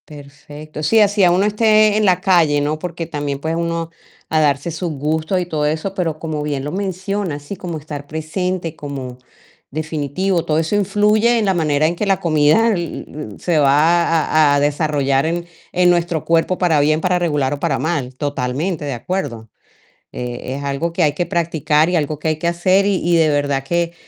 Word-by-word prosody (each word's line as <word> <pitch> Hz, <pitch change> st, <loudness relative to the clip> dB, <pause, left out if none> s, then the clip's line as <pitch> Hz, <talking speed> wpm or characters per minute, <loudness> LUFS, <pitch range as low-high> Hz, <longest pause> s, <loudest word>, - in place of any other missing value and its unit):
Perfecto. 145 Hz, +1 st, -10 dB
Sí, 220 Hz, +9 st, +4 dB
así 205 Hz, -1 st, +3 dB
ya 180 Hz, -2 st, +6 dB
uno 185 Hz, +3 st, +2 dB
esté 215 Hz, 0 st, +4 dB
en 215 Hz, 0 st, +2 dB
la 185 Hz, -2 st, +3 dB
calle, 170 Hz, -6 st, +3 dB
¿no? 150 Hz, +2 st, -1 dB
Porque 170 Hz, -1 st, -5 dB
también, 145 Hz, -3 st, -4 dB
pues, 160 Hz, +3 st, -2 dB
uno 170 Hz, 0 st, -2 dB, 0.4 s
a 160 Hz, -, +2 dB
darse 145 Hz, +2 st, +1 dB
sus 165 Hz, +1 st, -3 dB
gustos 155 Hz, +5 st, -1 dB
y 180 Hz, -, -2 dB
todo 155 Hz, -3 st, -2 dB
eso, 160 Hz, +6 st, -2 dB
pero 170 Hz, -5 st, -2 dB
como 155 Hz, -2 st, -4 dB
bien 145 Hz, -2 st, -3 dB
lo 145 Hz, -, -4 dB
mencionas, 190 Hz, -4 st, -3 dB
sí, 145 Hz, -, -6 dB
como 175 Hz, -3 st, -5 dB
estar 145 Hz, -1 st, -8 dB
presente, 165 Hz, +2 st, -3 dB
como 135 Hz, -4 st, -7 dB, 0.5 s
definitivo, 155 Hz, +4 st, -2 dB
todo 155 Hz, -2 st, 0 dB
eso 165 Hz, +5 st, -1 dB
influye 210 Hz, +4 st, +2 dB
en 220 Hz, -, +1 dB
la 195 Hz, -, +2 dB
manera 155 Hz, -3 st, +1 dB
en 170 Hz, -, -1 dB
que 210 Hz, -, -2 dB
la 195 Hz, -2 st, +2 dB
comida 155 Hz, +7 st, +3 dB
e-u-e 155 Hz, -, -6 dB
se 175 Hz, -3 st, 0 dB
va 150 Hz, +5 st, +4 dB
a 155 Hz, -3 st, +3 dB
a -, -, +2 dB
desarrollar 145 Hz, -1 st, +1 dB
en 170 Hz, +1 st, -2 dB, 0.3 s
en 180 Hz, 0 st, +3 dB
nuestro 175 Hz, -2 st, 0 dB
cuerpo, 165 Hz, +2 st, +1 dB
para 170 Hz, -5 st, +2 dB
bien, 155 Hz, +2 st, +2 dB
para 180 Hz, +1 st, +1 dB
regular 150 Hz, -6 st, 0 dB
o 145 Hz, -, -5 dB
para -, -, 0 dB
mal, 145 Hz, -6 st, -2 dB
totalmente 145 Hz, +5 st, -2 dB
de 140 Hz, -, -3 dB
acuerdo. 120 Hz, -, -4 dB, 0.6 s
Eh, 125 Hz, +1 st, -5 dB
es 140 Hz, -, -6 dB
algo 140 Hz, +4 st, -2 dB
que 170 Hz, -, +1 dB
hay 150 Hz, -2 st, +2 dB
que 175 Hz, +4 st, -2 dB
practicar 160 Hz, -2 st, +1 dB
y 180 Hz, -, 0 dB
algo 150 Hz, -2 st, -1 dB
que 155 Hz, -, -3 dB
hay 155 Hz, -, +1 dB
que 170 Hz, -, -1 dB
hacer, 185 Hz, +3 st, +2 dB
y 200 Hz, -2 st, +2 dB
y 175 Hz, 0 st, +2 dB
de 160 Hz, -2 st, +4 dB
verdad 145 Hz, -2 st, 0 dB
que 170 Hz, +3 st, -1 dB
160 Hz, 200 wpm, -18 LUFS, 145-180 Hz, 0.6 s, ya